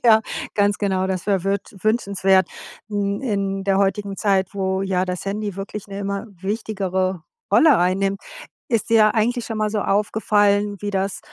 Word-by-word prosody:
Ja. 220 -2 +7 0.3
Ganz 205 0 +2
genau, 190 -2 0
das 185 -1 -3
wär 195 -3 +1
würt 200 +1 -2
wünschenswert. 195 -4 +2 0.4
Hm, 200 -1 -1
in 195 -4 -1
der 195 -1 +2
heutigen 200 0 0
Zeit, 195 -2 +1
wo 190 0 -1
ja 185 -1 0
das 180 0 -4
Handy 200 -1 -3
wirklich 195 +1 -6
'ne 200 0 -6
immer 200 +2 -3
wichtigere 190 -4 -2 0.3
Rolle 310 -7 +6
einnimmt, 195 +2 +1 0.5
ist 230 -2 0
dir 215 -2 +5
eigentlich 235 +2 +1
schon 225 -2 -4
mal 215 0 0
so 210 0 -1
aufgefallen, 205 0 +2
wie 205 0 -3
das 195 0 -1
200 Hz, 165 wpm, -21 LUFS, 195-210 Hz, 0.5 s, Ja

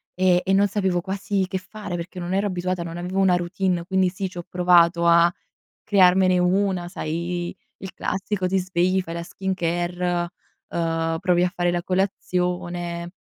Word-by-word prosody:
e 185 -1 +3
e 190 - +2
non 200 +1 +4
sapevo 190 -3 0
quasi 195 +1 -1
che 190 - -1
fare, 200 0 -7
perché 175 +2 -6
non 175 +1 -3
ero 200 +2 +1
abituata, 180 -1 -2
non 170 0 -6
avevo 180 +2 -3
una 190 -2 +4
routine. 175 0 -1
Quindi 190 0 +2
sì, 190 +1 -4
c'ho 175 -1 -7
provato 175 -1 +4
a 170 0 +6 0.5
crearmene 185 -2 +4
una, 180 0 +1
sai 175 0 -3
i - - -10 0.2
il 190 - -8
classico 190 0 -2
ti 190 +1 +1
svegli, 185 0 +1
fai 165 -2 -7
la 170 - -4
skincare, 175 -1 -2 0.4
uhm, 165 -1 -1
provi 180 -1 +2
a 180 - +1
fare 175 -1 +1
la 175 0 -2
colazione, 180 -2 -2
180 Hz, 165 wpm, -23 LUFS, 175-190 Hz, 0.5 s, a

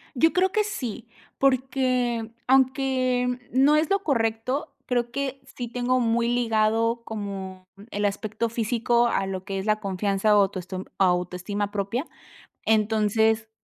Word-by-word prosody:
Yo 325 +6 +3
creo 370 +1 +2
que 425 - +2
sí, 245 - -5 0.3
porque 255 -3 +1 0.2
aunque 255 -1 +2
no 275 +4 +4
es 305 0 +2
lo 395 0 +3
correcto, 250 +2 -1
creo 240 -1 -1
que 275 0 -3
sí 245 - -4
tengo 245 +2 0
muy 235 0 +1
ligado 230 -1 +1
como 195 -3 -6 0.2
el 205 0 -1
aspecto 215 +3 -2
físico 235 +1 +1
a 195 -4 0
lo 190 -1 -4
que 195 0 -4
es 190 - -5
la 215 0 +2
confianza 200 +1 +1
o - - +7
autoestoma 185 -1 -3
autoestima 180 +2 0
propia, 205 +7 -2 0.6
entonces, 220 +1 +2
230 Hz, 135 wpm, -25 LUFS, 205-255 Hz, 0.6 s, o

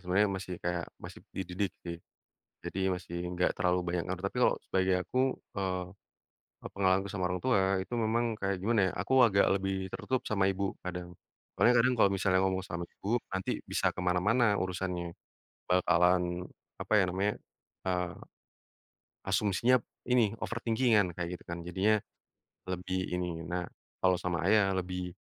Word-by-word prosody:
sebenarnya 95 +3 +2
masih 95 -1 -5
kayak 90 -1 -1
masih - - -10 0.2
dididik 95 0 -2
sih. 85 -1 -5 0.6
Jadi 95 - -4 0.2
masih 90 -1 -7 0.2
nggak 90 - +2
terlalu 90 0 +2
banyak 90 - 0
ngaruh, 95 +1 -4
tapi 100 - -5
kalau - - +4
sebagai 95 0 +1
aku, 130 - -3 0.4
eee, 95 -2 -1 0.9
pengalamanku 95 0 +2
sama 90 -3 -1
orang 90 0 -2
tua 130 -5 +4 0.3
itu 110 - -6
memang 115 0 +1 0.2
kayak 95 0 0
gimana 110 +4 +2
ya, - - -7
aku 100 +8 -2
agak 100 -4 +5
lebih 95 -1 -1
tertutup 130 -1 -2
sama 100 -2 +2
ibu, 95 0 -1
kadang. 90 -1 -6 0.4
Soalnya 125 - +5
kadang 130 - +3
kalau 100 - +5
misalnya 95 -1 +2
ngomong 95 0 0
sama 85 -3 -4
ibu 115 +4 -2
nanti 95 -1 -2
bisa - - +1
kemana-mana 100 +5 +2
urusannya. 90 -2 -2 0.6
Bakalan 90 0 +4 0.6
apa - - -4
ya 95 - +5
namanya, 100 +3 +1 0.5
eee, 90 -1 -1 1.1
asumsinya 105 +5 +3 0.2
ini 115 -4 +2
overthingking-an 115 -5 +2
kayak 85 - -2
gitu - - -20
kan, 85 0 -5
jadinya 95 +5 +2 0.8
lebih 95 +1 -2
ini 90 -2 -2
nah 90 +1 -3 0.3
kalau 95 -1 +4
sama 90 -1 -1
ayah 100 -2 +4
lebih 90 -1 -3
95 Hz, 150 wpm, -31 LUFS, 90-100 Hz, 1.1 s, agak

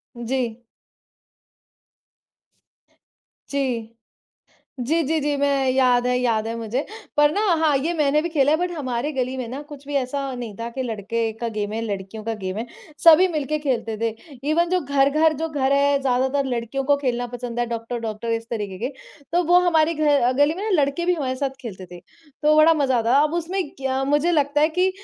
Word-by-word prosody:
जी। 240 -1 -3 2.9
जी। 250 -5 -2 0.9
जी, 305 +7 +1
जी, 315 +3 0
जी। 290 0 0
मैं 275 -1 +1
याद 250 -2 +3
है 250 0 +2
याद 230 -3 0
है 230 - -3
मुझे 230 +5 -3 0.3
पर 295 0 +5
ना 410 - 0 0.2
हाँ, 310 -3 +3
ये 315 +6 -1
मैंने 300 -2 +2
भी 340 - -3
खेला 290 -3 +2
है 310 - +4
बट 355 +1 -1
हमारे 275 -3 -3
गली 260 -2 -2
में 250 -2 -4
ना 260 +5 -6
कुछ 285 -2 -11
भी 290 - -4
ऐसा 275 0 -2
नहीं 235 -4 -6
था 230 +1 -4
कि 260 +2 -4
लड़के 225 0 -2
का 235 - -1
गेम 210 -2 -3
है, 225 - -2
लड़कियों 205 0 -5
का 225 +1 -2
गेम 190 -2 -5
है, 225 - -3 0.4
सभी 335 +3 +8
मिलके 305 -3 -2
खेलते 235 -6 -2
थे। 230 - +2 0.4
इवेन 340 +2 +2
जो 365 0 +2
घर-घर 285 +3 +3
जो 325 - -1
घर 275 -3 0
है, 280 0 +3
ज़्यादातर 265 +2 +1
लड़कियों 245 +1 -2
को 285 +2 +3
खेलना 245 -3 -1
पसंद 240 0 -6
है, 240 - +1
डॉक्टर-डॉक्टर 230 -1 -4
इस 230 0 -4
तरीके 205 -5 -4
के, 280 - -9 0.4
तो 350 +1 +2
वो 350 +2 +5
हमारे 325 -1 +3
घ 290 -5 +2
गली 290 +2 +4
में 375 +4 -6
ना 440 - -2
लड़के 280 +5 -1
भी 360 - +3
हमारे 270 -6 -2
साथ 275 +1 -1
खेलते 195 -7 -8
थे, 175 - -9
तो 300 - -2
बड़ा 310 +2 +6
मज़ा 275 -5 +1
आता 230 +1 +1
था। 280 - +6
अब 305 +1 -1
उसमें 345 0 -2
क्या 265 0 -1
मुझे 295 +5 +2
लगता 295 -2 +2
है 310 - +4
कि 365 +3 +2
270 Hz, 200 wpm, -22 LUFS, 235-300 Hz, 2.9 s, सभी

